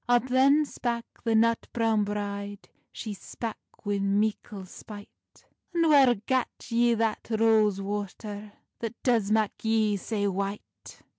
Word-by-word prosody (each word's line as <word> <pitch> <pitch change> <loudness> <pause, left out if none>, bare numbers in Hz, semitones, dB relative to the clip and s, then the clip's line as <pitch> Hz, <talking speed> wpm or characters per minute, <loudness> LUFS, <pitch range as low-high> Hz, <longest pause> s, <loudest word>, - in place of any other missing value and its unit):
Up 245 +1 +3
then 275 +4 +5
spak 235 -4 -3 0.2
the 230 -1 +2
nut 230 +1 +3
browne 225 -2 +2
bride, 205 0 -4 0.2
She 215 -3 -6
spak 225 +3 -6 0.3
wi 205 -1 0
meikle 200 0 -1
spite: 205 +2 -13 0.3
"And 335 -1 +3
whair 270 -4 +6
gat 250 +5 0 0.2
ye 235 0 +3
that 225 -1 -1
rose 220 -3 +3
water, 205 +1 -5 0.3
That 230 0 -4
does 230 -6 +2
mak 215 -1 +1
yee 220 -2 +2
sae 205 +1 -2
white?" 200 +1 -5
220 Hz, 135 wpm, -28 LUFS, 205-235 Hz, 0.3 s, whair